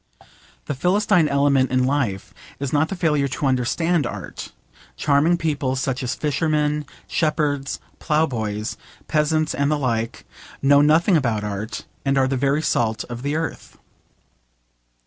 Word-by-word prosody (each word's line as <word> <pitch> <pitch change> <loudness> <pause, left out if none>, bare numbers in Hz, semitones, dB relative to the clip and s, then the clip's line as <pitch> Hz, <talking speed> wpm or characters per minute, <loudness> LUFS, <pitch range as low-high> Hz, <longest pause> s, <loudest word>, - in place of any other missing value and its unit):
The - - -2
Philistine 180 +3 +2
element 140 -2 +3
in 130 0 +2
life 130 -8 -1 0.3
is 140 -2 -3
not 150 +2 +2
the 195 - -3
failure 150 -5 +1
to 140 - -3
understand 135 +4 +1
art. - - -7 0.4
Charming 150 - +3
people, 145 -5 -1
such 130 -1 -2
as 125 -1 -2
fishermen, 150 -1 0 0.2
shepherds, 150 -4 -1 0.2
ploughboys, 115 -9 -1 0.3
peasants 155 0 +1
and 140 +1 0
the 150 - +2
like, 115 -5 -2 0.3
know 140 +1 +5
nothing 160 +5 +4
about 115 -8 +1
art, 105 +2 -4 0.2
and 135 0 +1
are 130 -1 +3
the 135 - -1
very 140 +3 +1
salt 110 -6 0
of 120 0 -5
the 140 +3 -2
earth. 160 0 -4
140 Hz, 140 wpm, -22 LUFS, 130-155 Hz, 0.4 s, know